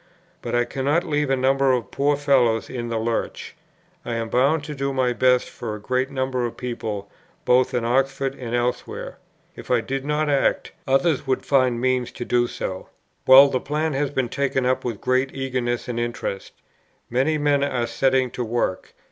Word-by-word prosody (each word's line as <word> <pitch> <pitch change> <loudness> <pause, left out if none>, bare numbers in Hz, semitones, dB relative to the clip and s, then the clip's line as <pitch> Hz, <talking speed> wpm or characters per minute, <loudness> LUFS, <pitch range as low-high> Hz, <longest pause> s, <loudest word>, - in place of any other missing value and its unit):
But 120 0 -3
I 120 0 +2
cannot 140 +7 0
leave 150 -3 -1
a 135 - +3
number 135 +1 +2
of 120 -5 -2
poor 145 +1 +1
fellows 125 -6 +2
in 120 -2 -4
the 115 - -1
lurch. 115 +1 -3 0.5
I 120 - -3
am 115 -1 -3
bound 140 +6 +2
to 150 0 -6
do 140 -1 -2
my 130 -2 +1
best 125 +2 +3
for 110 -3 -6
a - - -8
great 130 +5 -1
number 130 -2 -2
of 120 - -4
people 110 -5 -4 0.4
both 125 +1 +3
in 120 -1 0
Oxford 135 +2 0
and 120 -3 -5
elsewhere. 120 0 -3 0.4
If - - -11
I 125 - +3
did 135 +4 -3
not 150 +1 0
act, 140 -2 +1 0.2
others 135 +1 +2
would 130 - 0
find 130 -4 +2
means 130 -1 0
to 120 - -6
do 120 0 +2
so. 95 -5 -6 0.4
"Well, 135 +2 +10
the 130 - 0
plan 150 +3 -2
has 140 +1 0
been 130 -3 -1
taken 135 -1 -1
up 130 +1 +1
with 115 -5 -4
great 130 +1 0
eagerness 130 -3 -2
and 120 -1 -3
interest. 120 -4 -4 0.6
Many 135 +6 +1
men 145 -1 +2
are 125 -4 0
setting 130 +2 +1
to 125 - -3
work. 115 -5 -2
130 Hz, 190 wpm, -23 LUFS, 120-135 Hz, 0.6 s, Well